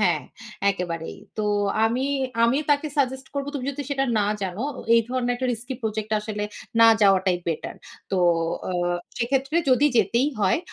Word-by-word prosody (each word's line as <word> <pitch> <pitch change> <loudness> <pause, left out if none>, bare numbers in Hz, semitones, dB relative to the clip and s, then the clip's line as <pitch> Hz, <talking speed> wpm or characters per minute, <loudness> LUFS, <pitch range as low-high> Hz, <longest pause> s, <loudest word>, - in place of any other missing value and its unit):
হ্যাঁ, 175 -6 +2 0.5
একেবারেই। 170 -4 -4 0.2
তো 215 - 0 0.4
আমি 240 +4 +1 0.4
আমিও 270 +6 +2
তাকে 290 +1 +2
সাজেস্ট 265 -1 0
করব, 280 0 -2
তুমি 260 -3 -3
যদি 285 +1 -5
সেটা 270 -1 +1
না 205 - +2 0.2
জানো 190 +3 -3 0.3
এই 230 - +6
ধরনের 250 -1 0
একটা 255 +1 -2
রিস্কি 245 +3 -5
প্রজেক্ট 215 -1 -3
আসলে 210 -1 -4 0.4
না 230 - +9
যাওয়াটাই 190 -2 +4
বেটার। 165 -2 -3 0.3
তো 195 - 0 0.5
আ - - -2 0.5
সেক্ষেত্রে 270 +5 0
যদি 260 +3 +5
যেতেই 235 +6 +3
হয় 195 +5 +3
235 Hz, 155 wpm, -24 LUFS, 200-265 Hz, 0.5 s, না